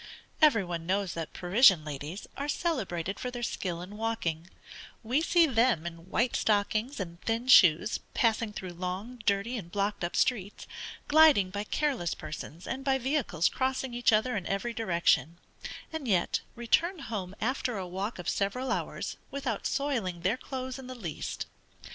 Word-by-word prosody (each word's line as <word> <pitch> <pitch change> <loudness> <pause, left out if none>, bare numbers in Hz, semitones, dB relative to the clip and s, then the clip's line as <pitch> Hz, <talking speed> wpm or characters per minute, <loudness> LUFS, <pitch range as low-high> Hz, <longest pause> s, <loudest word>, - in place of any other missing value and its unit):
Every 275 -10 +6
one 170 -2 -5
knows 195 -1 0
that 165 -2 -5
the - - -12
Parisian 185 - +5
ladies 150 +6 -6
are 285 +1 -3
celebrated 195 - -2
for 250 - -3
their 245 -1 -6
skill 175 -6 -3
in 200 +3 -9
walking: 195 -8 -2 0.6
we 250 +7 +1
see 340 0 +5
them 235 - +2
in 170 +1 -8
white 240 +4 +1
stockings 215 +5 +1
and 170 -2 -6
thin 230 +2 -1
shoes, 185 -3 +6 0.2
passing 225 -1 +2
through 185 -3 -6
long, 185 +7 -5
dirty, 200 +5 +1
and 170 -4 -10
blocked 205 -1 -1
up 175 - -2
streets, 210 -6 0 0.4
gliding 295 -12 +6
by 205 +1 -3
careless 255 - -1
persons, 155 +2 -8
and 270 - -4
by 270 -1 +2
vehicles 260 - +1
crossing 260 -1 -1
each 240 0 +3
other 220 +4 +2
in 190 -4 -3
every 200 +5 -2
direction, 170 -5 +1 0.6
and 315 -5 -4
yet 185 -5 +2
return 320 - +2
home 205 - -5
after 250 0 -1
a 185 -2 -4
walk 195 +5 -4
of 180 - -7
several 250 +7 -1
hours, - - -3
without 270 -6 -2
soiling 230 -12 -1
their 190 +6 +2
clothes 260 0 -6
in 260 - -9
the 255 - -7
least. 175 -11 -5
215 Hz, 165 wpm, -29 LUFS, 180-255 Hz, 0.6 s, Every